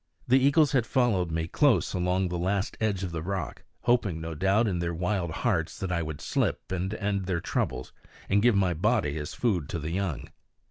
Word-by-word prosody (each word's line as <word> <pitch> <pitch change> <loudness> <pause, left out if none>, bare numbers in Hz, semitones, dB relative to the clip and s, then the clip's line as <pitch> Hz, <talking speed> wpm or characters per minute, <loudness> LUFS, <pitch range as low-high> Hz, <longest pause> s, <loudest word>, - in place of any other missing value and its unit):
The 130 +2 +5
eagles 140 +3 +4
had 125 -5 +1
followed 115 -10 +2
me 80 0 -2
close 120 - +2
along 90 0 0
the 90 - -2
last 95 +2 -1
edge 100 -4 0
of 90 -3 -4
rock, 85 0 -4 0.2
hoping 120 -9 +1
no 80 0 -5
doubt 95 +8 +2
in 90 -4 -1
their 85 0 -2
wild 90 0 -1
hearts 80 -2 -1
that 95 -2 -3
I 85 -1 0
would 80 -2 -5
slip, - - -1
and 95 +1 -2
end 100 -3 -1
their 90 -2 -1
troubles, - - -2 0.3
and 100 +1 +3
give 120 -1 +4
my 95 -3 +2
body 75 -2 +1
as 75 - -6
food 95 - 0
to - - -2
the 80 0 -4
young. 90 -6 -3
95 Hz, 200 wpm, -28 LUFS, 85-105 Hz, 0.3 s, The